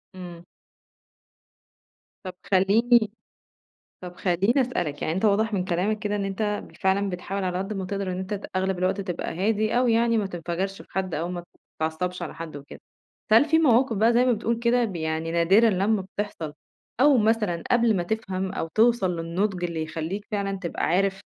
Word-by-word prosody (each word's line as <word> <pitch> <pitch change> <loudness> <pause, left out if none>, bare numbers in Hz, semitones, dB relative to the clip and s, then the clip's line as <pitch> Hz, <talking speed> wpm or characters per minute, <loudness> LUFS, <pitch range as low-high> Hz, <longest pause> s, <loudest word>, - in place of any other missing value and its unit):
إمم. 175 -2 -9 1.8
طَب 185 - -6 0.2
خليني 220 +4 +4 0.9
طَب 180 -1 -9
خليني 195 +10 +2
أسألك 175 - -2
يعني 160 - -1
أنت 190 - -2
واضح 215 +1 +2
من 185 -3 0
كلامك 195 +4 0
كده 210 0 -2
إن 200 - -2
أنت 195 +2 -3 0.2
بال - - -18
فعلًا 195 0 +1
بتحاول 190 +2 -4
على 180 -1 -1
قد 195 +3 -3
ما 195 -2 -3
تقدر 195 -1 -3
إن 180 - -4
أنت 190 +2 -3
ت 200 - -6
أغلب 190 -1 0
الوقت 185 +2 0
تبقى 180 -4 -4
هادي 215 +5 +1
أوي 245 -2 +3
يعني 230 0 +3
ما 205 - 0
تنفجرش 180 +2 -4
في - - -24
حد، 190 -2 -2
أو 165 +4 -2
ما 175 -1 -5 0.4
تتعصبش 175 +3 -2
على 165 - -5
حد 160 -2 -7
وكده، 140 0 -11 0.5
فهل 225 +5 +7
في 320 +1 +3
مواقِف 255 -6 +3
بقى 225 +4 +4
زي 245 +2 +4
ما 255 - +3
بتقُول 230 +1 -1
كده 240 +1 +2
ب 195 -5 -4
يعني 160 0 -2
نادرًا 195 +7 +4
لمّا 200 +2 +1
بتحصل، 190 -5 -5 0.5
أو 285 0 +6
مثلًا 210 -6 +1
قبل 235 -3 +3
ما 175 - 0
تفهم 190 -1 -3
أو 165 - -3
توصل 220 -6 +3
للنضج 180 +3 -2
اللي 170 -2 -2
يخليك 165 +6 -5
فعلًا 200 -2 -2
تبقى 175 -3 -3
عارف 195 +2 +1
195 Hz, 185 wpm, -25 LUFS, 180-220 Hz, 1.8 s, فهل